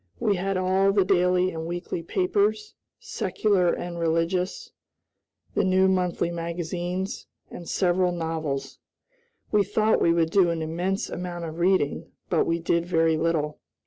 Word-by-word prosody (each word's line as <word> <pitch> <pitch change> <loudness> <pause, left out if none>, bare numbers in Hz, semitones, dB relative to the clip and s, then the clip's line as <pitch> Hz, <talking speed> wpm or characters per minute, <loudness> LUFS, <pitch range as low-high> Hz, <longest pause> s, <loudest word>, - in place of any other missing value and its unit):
We 205 -3 +1
had 195 +1 -1
all 190 +1 +2
the 195 -1 +3
daily 180 0 +2
and 160 -1 -5
weekly 175 0 -4
papers, 205 +5 0 0.3
secular 190 -5 0
and 175 -1 -4
religious, 170 +3 -1 0.8
the - - +1
new 190 0 +3
monthly 180 -2 0
magazines, 175 +2 -4 0.2
and 170 - -8
several 180 -1 +2
novels. 160 -5 -3 0.7
We 210 -1 +4
thought 215 +2 +1
we 170 - +4
would 165 -1 +1
do 185 -2 +4
an 165 -1 -2
immense 180 +6 -2
amount 175 -1 -5
of 160 +1 -7
reading, 180 -5 +1 0.2
but 170 - +2
we 165 - +1
did 170 0 0
very 165 -2 +2
little. 155 -2 -1
175 Hz, 145 wpm, -25 LUFS, 165-190 Hz, 0.8 s, We